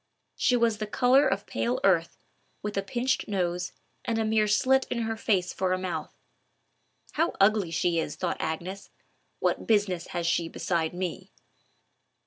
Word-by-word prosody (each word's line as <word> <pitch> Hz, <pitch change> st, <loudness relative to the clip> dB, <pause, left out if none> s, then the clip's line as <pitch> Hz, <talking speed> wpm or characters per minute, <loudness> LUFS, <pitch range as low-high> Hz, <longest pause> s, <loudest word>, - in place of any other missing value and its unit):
She 250 Hz, -, +2 dB
was 230 Hz, -2 st, +2 dB
the 215 Hz, -, -3 dB
color 260 Hz, +5 st, +4 dB
of -, -, -1 dB
pale 250 Hz, +2 st, -1 dB
earth, 170 Hz, -4 st, +2 dB, 0.5 s
with 210 Hz, 0 st, -3 dB
a 195 Hz, -, +1 dB
pinched 240 Hz, +6 st, -1 dB
nose, 180 Hz, -3 st, -1 dB, 0.3 s
and 230 Hz, -, -1 dB
a 225 Hz, -, +1 dB
mere 215 Hz, -1 st, +2 dB
slit 260 Hz, +6 st, +3 dB
in 235 Hz, -1 st, -1 dB
her 225 Hz, 0 st, -2 dB
face 195 Hz, -5 st, 0 dB
for 185 Hz, -1 st, 0 dB
a -, -, +1 dB
mouth. 185 Hz, -1 st, -4 dB, 1.0 s
"How 330 Hz, +3 st, 0 dB
ugly 200 Hz, -2 st, +4 dB
she 170 Hz, +1 st, +1 dB
is!" -, -, -3 dB
thought -, -, -2 dB
Agnes. 180 Hz, +5 st, -4 dB, 0.5 s
"What -, -, -1 dB
business 200 Hz, -6 st, +1 dB
has 170 Hz, -1 st, -3 dB
she 170 Hz, -1 st, +1 dB
beside 170 Hz, -1 st, -1 dB
me!" 180 Hz, -2 st, -4 dB
200 Hz, 160 wpm, -27 LUFS, 175-225 Hz, 1.0 s, color